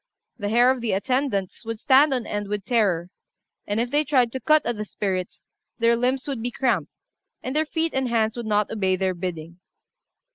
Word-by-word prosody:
The 205 - -2
hair 240 +3 +5
of 260 -2 -2
the 230 -4 -1
attendants 225 -2 -1
would 225 0 -4
stand 275 +5 +5
on 250 -3 -1
end 205 -1 -3
with 205 -1 -3
terror; 185 -7 +1 0.6
and 205 +2 -1
if 240 +1 -1
they 295 +1 +3
tried 260 -5 +2
to 260 - -4
cut 310 +2 +3
at 240 - -1
the 210 - -4
spirits, 190 -3 -4 0.3
their 235 0 +3
limbs 255 +3 0
would 270 -5 -3
be 245 - -2
cramped, 235 - 0 0.5
and 260 +2 -4
their 310 0 +1
feet 325 +1 -1
and 265 -1 0
hands 225 -1 +1
would 240 -2 -5
not 210 -1 +1
obey 190 -4 +1
their 190 0 0
bidding. 170 -1 -6
230 Hz, 205 wpm, -24 LUFS, 200-260 Hz, 0.6 s, hair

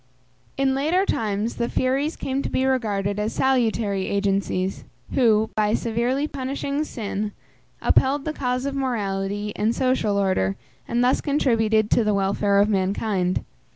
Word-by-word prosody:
In 270 -1 +2
later 315 +8 +1
times 215 - -1
the 235 0 -1
Furies 275 +5 0
came 270 +1 -2
to - - -3
be 260 - 0
regarded 205 -6 0
as 210 +2 -1
salutary 225 -7 +1
agencies, 195 -1 -1 0.3
who, 220 -4 +3
by 215 0 +2
severely 240 +5 0
punishing 280 +1 -3
sin, 210 -6 -4 0.5
upheld 275 +2 +3
the 310 - -2
cause 255 -2 -2
of 280 - -2
morality 205 -5 -2
and 220 +3 0
social 255 -6 +1
order, 185 - +1 0.3
and 240 +1 +1
thus 250 +1 +2
contributed 225 -7 +2
to 235 - +4
the 210 -1 +1
welfare 200 +1 +1
of 200 +1 +5
mankind. 190 -2 0
225 Hz, 145 wpm, -23 LUFS, 200-265 Hz, 0.5 s, of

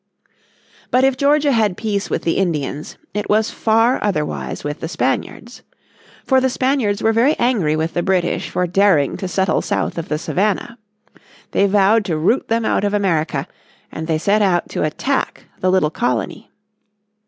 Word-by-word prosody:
But 255 +1 +3
if 270 -1 +3
Georgia 285 +2 +2
had 215 -6 +1
peace 205 -3 -2
with - - -2
the 165 - 0
Indians 150 -5 -2 0.2
it 210 0 -3
was 215 +1 +2
far 225 +3 +2
otherwise 155 -8 -2
with 145 0 -4
the - - -4
Spaniards. 170 - -3 0.6
For 265 -1 +3
the 260 - +2
Spaniards 255 -5 0
were 225 - +3
very 250 +7 +3
angry 215 -11 +1
with 160 +1 -2
the 175 - 0
British 180 -1 0
for 180 - 0
daring 180 -5 +2
to 190 - -4
settle 190 -2 +1
south - - -2
of 165 - -7
the 150 - 0
Savannah. 210 +8 -1 0.7
They 200 - +3
vowed 205 +2 +3
to 165 -4 -1
root 185 +12 +1
them 230 0 0
out - - +1
of 205 0 0
America, 160 -8 0 0.4
and 160 0 -6
they 160 -2 +1
set 205 +6 +1
out 185 -4 +1
to - - -3
attack 265 - -2
the 185 - +1
little 185 -5 +2
colony. 125 -6 -2
200 Hz, 170 wpm, -19 LUFS, 165-225 Hz, 0.7 s, But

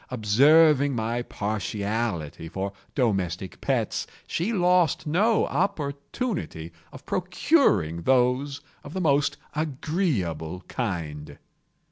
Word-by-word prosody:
Observing 140 +5 +5
my 115 +1 -1
partiality 105 -7 -3
for 95 +3 -4 0.2
domestic 95 - -1
pets, - - -1 0.2
she 180 +8 -1
lost 180 -5 +2
no 205 +9 +3
opportunity 145 - -3 0.2
of - - -12
procuring 180 - +2
those 130 - +2 0.2
of 145 - -9
the 190 - -2
most 145 -3 +2 0.2
agreeable 130 - -2
kind. 75 - -4
125 Hz, 90 wpm, -26 LUFS, 95-160 Hz, 0.2 s, Observing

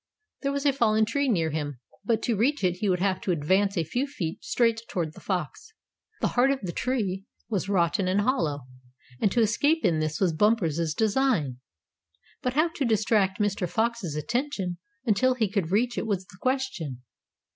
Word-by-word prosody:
There 275 - 0
was 280 0 -2
a 280 - +4
fallen 220 -4 +3
tree 280 +5 0
near 165 -8 +1
him, 145 -4 -3 0.2
but 225 +1 0
to 235 - +1
reach 260 +5 +1
it 180 -1 +2
he 205 +1 0
would 180 -1 +1
have 190 -1 +1
to 190 - -1
advance 190 +5 +2
a 165 - +2
few 245 - -2
feet 180 - -5
straight 230 -2 +1
toward 165 -4 -2
the - - -12
fox. 185 - -4 0.5
The - - +2
heart 245 +2 +3
of 275 -1 +1
the 180 - -3
tree 200 -5 -2 0.2
was 200 -3 -1
rotten 185 0 +2
and 190 +3 +2
hollow, 170 - 0 0.6
and 205 - +2
to 240 - +2
escape 290 +9 +2
in 160 -2 +3
this 155 0 -2
was 180 -4 +2
Bumper's 170 -5 +1
design. 215 - +1 0.8
But 250 - -1
how 310 +5 +3
to 315 -3 -3
distract 215 -3 +2
Mr. 200 -4 0
Fox's 225 -7 -1
attention 200 - -2 0.3
until 255 +3 +3
he 225 -4 +1
could 195 -4 -1
reach 240 +6 +1
it - - -3
was 190 -3 -1
the 185 - -16
question. 255 - -2
205 Hz, 190 wpm, -27 LUFS, 175-245 Hz, 0.8 s, a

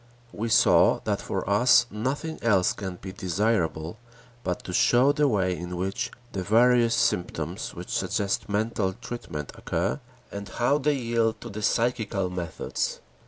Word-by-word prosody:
We 115 +3 -3
saw 110 - +5
that - - -1
for - - -3
us - - +5
nothing 135 +9 -3
else 100 -6 +3
can 95 -3 -6
be 95 +1 -8
desirable, 95 -2 -1 0.4
but 90 -1 -3
to 90 - -6
show 125 +9 +4
the 145 0 +2
way 95 -7 +1
in 90 0 -6
which 95 +2 -2 0.2
the 95 - -3
various 115 +3 +4
symptoms 90 -6 -1
which - - -5
suggest 100 +2 -1
mental 105 -2 0
treatment 75 -11 -7
occur, - - -2 0.3
and 100 0 -6
how 120 +9 +1
they 145 +1 +1
yield 115 -3 0
to 120 - -7
the 110 +2 -6
psychical 110 -5 0
methods. 90 -3 -3
105 Hz, 150 wpm, -26 LUFS, 90-120 Hz, 0.4 s, saw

